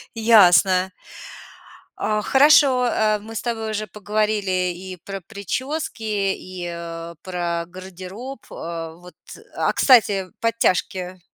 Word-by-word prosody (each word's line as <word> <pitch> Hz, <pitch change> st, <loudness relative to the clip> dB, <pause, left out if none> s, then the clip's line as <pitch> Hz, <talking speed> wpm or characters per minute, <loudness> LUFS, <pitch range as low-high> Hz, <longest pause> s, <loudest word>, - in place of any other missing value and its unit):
Ясно. 190 Hz, -4 st, +5 dB, 1.1 s
А 215 Hz, 0 st, 0 dB
хорошо, 265 Hz, 0 st, +5 dB
э, 215 Hz, -2 st, +1 dB
мы 220 Hz, +2 st, -10 dB
с -, -, -2 dB
тобой 225 Hz, -2 st, -3 dB
уже 215 Hz, 0 st, -2 dB
поговорили 205 Hz, -2 st, -1 dB
и 185 Hz, +1 st, -8 dB
про 195 Hz, -1 st, -6 dB
причёски, 225 Hz, -, -4 dB, 0.3 s
и, 185 Hz, -1 st, -7 dB
а, 170 Hz, 0 st, -7 dB
про 175 Hz, -2 st, -3 dB
гардероб. 190 Hz, +8 st, -9 dB
А 165 Hz, -1 st, -6 dB
вот 180 Hz, +1 st, -15 dB, 0.4 s
А, -, -, +1 dB
кстати, 205 Hz, -7 st, +4 dB
подтяжки 185 Hz, -5 st, 0 dB
195 Hz, 110 wpm, -22 LUFS, 180-220 Hz, 1.1 s, Ясно